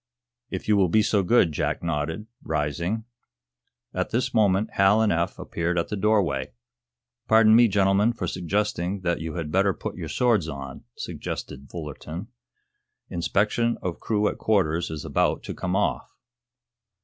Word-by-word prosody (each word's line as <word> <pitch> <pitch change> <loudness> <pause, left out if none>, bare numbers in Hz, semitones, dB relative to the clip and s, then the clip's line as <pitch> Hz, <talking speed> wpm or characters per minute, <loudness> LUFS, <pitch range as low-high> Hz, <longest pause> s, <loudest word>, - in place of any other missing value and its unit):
"If - - -5
you 105 - +4
will 95 -3 +3
be 110 +5 +4
so 105 -2 +2
good," 95 -3 +4
Jack 75 - -2
nodded, 80 +5 -2 0.2
rising. 85 +8 -2 0.9
At - - -1
this 120 +2 -1
moment 105 -2 +2
Hal 95 +2 +4
and 110 -1 +3
Eph 85 +1 0
appeared 85 +1 -2
at 85 - 0
the - - -2
doorway. 95 - +1 0.7
"Pardon 110 0 +6
me, 120 0 +7
gentlemen, 100 +2 +3
for 105 - -4
suggesting 95 +1 -1
that 85 -2 -1
you 80 0 -5
had 80 -3 -4
better 95 0 +2
put - - -6
your - - -5
swords 115 -10 +2
on," 70 -2 -7
suggested 70 +1 -6
Fullerton, 80 - -7 0.8
"Inspection 105 +7 +1
of 90 -2 -3
crew 105 -1 +1
at - - -3
quarters 85 -6 +1
is 80 -2 -6
about - - +1
to - - -5
come - - -2
off." - - 0
95 Hz, 155 wpm, -25 LUFS, 85-105 Hz, 0.9 s, me